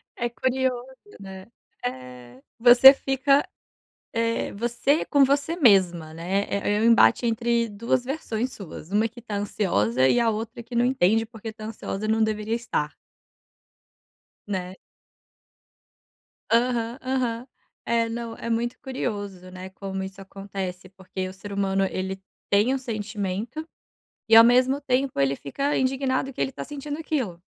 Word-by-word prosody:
É 240 0 -2
curioso, 255 +1 -1 0.3
né. 190 -1 -10 0.4
Eh, 125 0 -7 0.2
você 245 +3 +9
fica, 275 +1 +1 0.7
eh, 230 0 -1
você 240 +7 0
com 285 -2 +4
você 280 +4 0
mesma, 180 - +3
né. 185 +5 -1
É 205 +1 0
é - - 0
um - - +2
embate 235 +1 +5
entre 235 0 +1
duas 230 +4 -1
versões 255 -3 -3
suas, 185 -2 -10
uma 215 +2 +2
que 235 +2 -13
está 220 -3 -6
ansiosa 130 - +1
e 240 - +3
a 235 -1 +3
outra 225 +2 -4
que 235 +1 -9
não 240 +1 +3
entende 225 -3 +2
porque 225 0 -9
está 215 0 -9
ansiosa 215 -1 -5
não 220 0 +2
deveria 215 +1 -1
estar. 190 -10 -3 1.5
Né. 185 -2 -4 1.7
Aham, 235 0 +1
aham, 255 -2 -2 0.4
eh, 230 0 +1
não, 230 0 -5
é 230 - -5
muito 235 +1 -1
curioso, 205 -8 -5
né, 185 +1 -8
como 195 0 -5
isso 190 +1 -8
acontece. 195 -1 -6
Porque 190 0 -6
o 185 - -8
ser 195 +2 -10
humano, 195 -1 0
ele 190 +1 -4 0.3
tem 210 +6 +3
um - - +1
sentimento 215 - -4 0.6
e 225 - +7
ao 225 - +11
mesmo 255 +3 +4
tempo 265 - -1
ele 140 0 +2
fica 275 - -2
indignado 265 0 0
que - - -13
ele - - +1
está - - -7
sentindo 290 0 -6
aquilo. 255 - -3
225 Hz, 150 wpm, -25 LUFS, 195-250 Hz, 1.7 s, ao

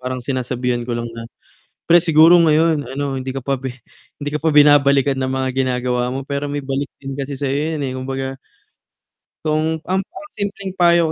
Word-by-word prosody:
parang 130 0 -4
sinasabihan 125 -2 -2
ko 120 - -1
lang 120 0 -3
na, 115 0 -8 0.6
"Pre 175 - +8
siguro 165 +2 +7
ngayon 160 -1 +3
ano, 135 +1 -3
hindi 130 0 -4
ka 135 - -4
pa 135 -2 0
pe 130 -2 -6 0.5
hindi 145 - -2
ka 150 - -1
pa 160 - +1
binabalikan 140 -2 +5
ng 130 0 -1
mga 130 0 -1
ginagawa 125 -1 0
mo 135 - -3
pero 140 +1 -3
may 145 0 -3
balik 135 +1 -2
din 135 0 -6
kasi 140 +1 -4
sayo 140 0 -1 0.2
'yan, 145 - -4
eh." 130 - -3
Kumbaga 135 0 -4 1.1
kung 155 +1 +1
ang 190 +2 0
mga 305 - -12
simpleng 200 -2 -4
payo 170 -1 +5
140 Hz, 190 wpm, -19 LUFS, 130-155 Hz, 1.1 s, Pre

